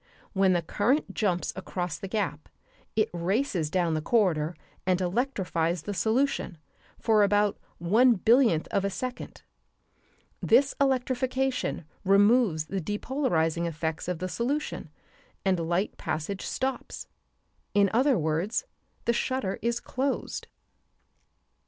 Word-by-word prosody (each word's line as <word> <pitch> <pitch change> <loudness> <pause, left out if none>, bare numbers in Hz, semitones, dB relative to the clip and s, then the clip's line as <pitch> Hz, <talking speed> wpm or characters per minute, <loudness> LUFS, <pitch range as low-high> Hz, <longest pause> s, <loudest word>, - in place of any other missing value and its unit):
When 190 -2 +4
the 175 -1 +1
current 240 - 0
jumps 180 -5 0
across 180 -3 -4
the 195 - -5
gap 190 -7 -3 0.5
it 215 -1 +3
races 180 - 0
down 175 -1 +1
the 155 - 0
corridor 170 -5 +1 0.3
and 185 -1 +1
electrifies 180 - -1
the 205 - -4
solution 225 -3 0 0.4
for 220 -2 +3
about 205 0 +2 0.2
one 225 +9 +4
billionth 225 - +3
of 195 - 0
a 200 - +1
second. 250 +5 -6 1.0
This 265 +5 +4
electrification 260 - 0 0.2
removes 200 -4 +4
the 195 +3 -3
depolarizing 170 - 0
effects 160 0 -3
of 180 -1 -1
the 185 +3 -3
solution 265 +10 -2 0.6
and 190 -2 +2
light 180 +4 0
passage 185 +5 -3
stops; 265 -1 -3 0.7
in 200 -1 +5
other 260 +3 +4
words, 165 - -1 0.4
the 235 - +3
shutter 255 -5 -1
is 235 +2 0
closed. 265 0 -3
200 Hz, 120 wpm, -28 LUFS, 175-245 Hz, 1.0 s, in